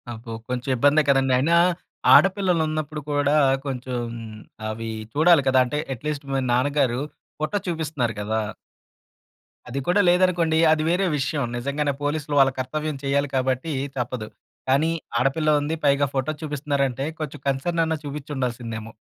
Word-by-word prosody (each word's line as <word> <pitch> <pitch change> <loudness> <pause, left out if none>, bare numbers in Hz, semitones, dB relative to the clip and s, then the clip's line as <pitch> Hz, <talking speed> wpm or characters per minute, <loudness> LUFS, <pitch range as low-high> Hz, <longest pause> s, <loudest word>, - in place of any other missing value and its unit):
అబ్బో! 115 0 -7 0.2
కొంచెం 125 +1 -3
ఇబ్బందే 145 +5 +4
కదండీ! 135 -1 +3
అయినా 155 +6 +3 0.6
ఆడపిల్లలున్నప్పుడు 160 -6 +2
కూడా 145 0 +2 0.3
కొంచెం 130 -2 -4 0.7
అవి 115 +1 -5 0.2
చూడాలి 160 0 +5
కదా! 130 0 +4
అంటే 135 +4 -3 0.2
ఎట్‌లీస్ట్ 145 +3 -4
మీ 135 - +1
నాన్నగారు 130 -1 +1 0.4
ఫోటో 155 +7 -1
చూపిస్తున్నారు 150 -8 -2
కదా! 110 +2 -1 1.3
అది 135 +3 -3
కూడా 190 +4 +4
లేదనుకోండి. 175 -3 +3
అది 155 -1 +2
వేరే 180 +3 +2
విషయం. 145 +1 -1
నిజంగానే 140 +3 -1
పోలీసులు 145 0 -2
వాళ్ళ 135 0 +5
కర్తవ్యం 155 +3 -3
చేయాలి 140 +1 +1
కాబట్టి 130 +4 0 0.2
తప్పదు. 120 -3 -3 0.4
కానీ 145 +5 +3 0.3
ఆడపిల్ల 135 +5 +1
ఉంది 150 +3 -2
పైగా 140 0 +4
ఫోటో 135 +3 0
చూపిస్తున్నారంటే 140 -3 -1 0.2
కొంచెం 150 -3 -5
కన్సర్న్ 165 +5 0
అన్న 160 0 0
చూపించి 145 +1 -6
ఉండాల్సిందేమో. 115 -4 -4
140 Hz, 130 wpm, -23 LUFS, 130-155 Hz, 1.3 s, చూడాలి